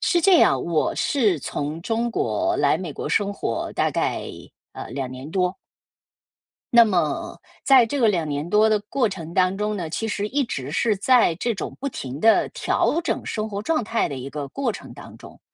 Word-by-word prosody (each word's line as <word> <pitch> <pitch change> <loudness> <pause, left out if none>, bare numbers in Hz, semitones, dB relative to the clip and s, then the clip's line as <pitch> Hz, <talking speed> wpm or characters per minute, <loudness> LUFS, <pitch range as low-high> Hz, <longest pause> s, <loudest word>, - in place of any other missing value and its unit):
是 345 -2 +2
这 370 +2 +5
样， 135 -1 +4
我 165 -2 0
是 215 - +1
从 150 +5 -4
中 230 +5 -1
国 330 +8 0
来 - - +3
美 175 -6 -6
国 - - -5
生 200 +5 +1
活 115 -11 -3
大 - - +1
概 - - -1 0.5
呃， - - -8
2 130 0 -4
年 130 +4 -8
多。 180 0 0 1.2
那 235 - +10
么 175 -8 -1 0.3
在 260 -4 +6
这 280 +5 -2
个 230 - +5
2 170 -6 0
年 145 +3 -3
多 215 +2 +4
的 215 -1 +2
过 225 +3 0
程 170 -4 -7
当 185 +2 +2
中 210 0 -2
呢， 170 -4 -4
其 225 +7 -3
实 205 0 -2
一 280 +6 0
直 140 - -5
是 215 +4 +1
在 235 -1 +4
这 235 +6 -1
种 - - -5
不 280 - -2
停 135 - -6
地 225 +7 +4
调 335 - 0
整 - - -2
生 215 0 -3
活 200 0 -5
状 310 -3 0
态 230 +1 0
的 140 - -5
一 130 +1 -6
个 145 -1 -6
过 255 - -2
程 - - -10
当 - - -12
中。 - - -14
205 Hz, 210 characters per minute, -23 LUFS, 155-235 Hz, 1.2 s, 那